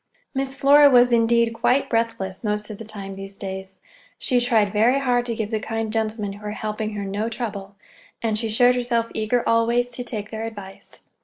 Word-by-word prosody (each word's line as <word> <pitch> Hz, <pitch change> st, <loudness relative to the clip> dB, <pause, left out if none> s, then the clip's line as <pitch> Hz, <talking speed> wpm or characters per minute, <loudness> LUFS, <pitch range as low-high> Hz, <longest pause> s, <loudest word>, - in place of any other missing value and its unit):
Miss 270 Hz, 0 st, -1 dB
Flora 285 Hz, +1 st, +6 dB
was, 245 Hz, -1 st, +5 dB
indeed, 235 Hz, 0 st, +3 dB
quite 250 Hz, +4 st, +1 dB
breathless 225 Hz, -5 st, -2 dB
most 210 Hz, 0 st, -2 dB
of 205 Hz, -, -9 dB
the -, -, -6 dB
time, 200 Hz, -2 st, -7 dB
these 195 Hz, 0 st, -8 dB
days. 190 Hz, -1 st, -7 dB, 0.4 s
She 250 Hz, -2 st, +1 dB
tried 220 Hz, -5 st, +2 dB
very 230 Hz, +5 st, +4 dB
hard 245 Hz, -3 st, +1 dB
to 230 Hz, -, -2 dB
give 220 Hz, 0 st, -3 dB
the 220 Hz, -, 0 dB
kind 225 Hz, 0 st, -3 dB
gentlemen 215 Hz, -2 st, -2 dB
who 205 Hz, +1 st, -13 dB
were 210 Hz, 0 st, -4 dB
helping 215 Hz, 0 st, -4 dB
her 200 Hz, -1 st, -4 dB
no 205 Hz, +3 st, -2 dB
trouble, 205 Hz, -4 st, -6 dB, 0.4 s
and 225 Hz, -2 st, -1 dB
she 225 Hz, +1 st, -1 dB
showed 245 Hz, +3 st, +4 dB
herself 240 Hz, -2 st, -1 dB
eager 220 Hz, +2 st, 0 dB
always 235 Hz, +2 st, +2 dB
to 245 Hz, +1 st, -5 dB
take 215 Hz, -4 st, -6 dB
their 220 Hz, 0 st, -4 dB
advice. 200 Hz, -4 st, -10 dB
225 Hz, 200 wpm, -23 LUFS, 210-240 Hz, 0.4 s, Flora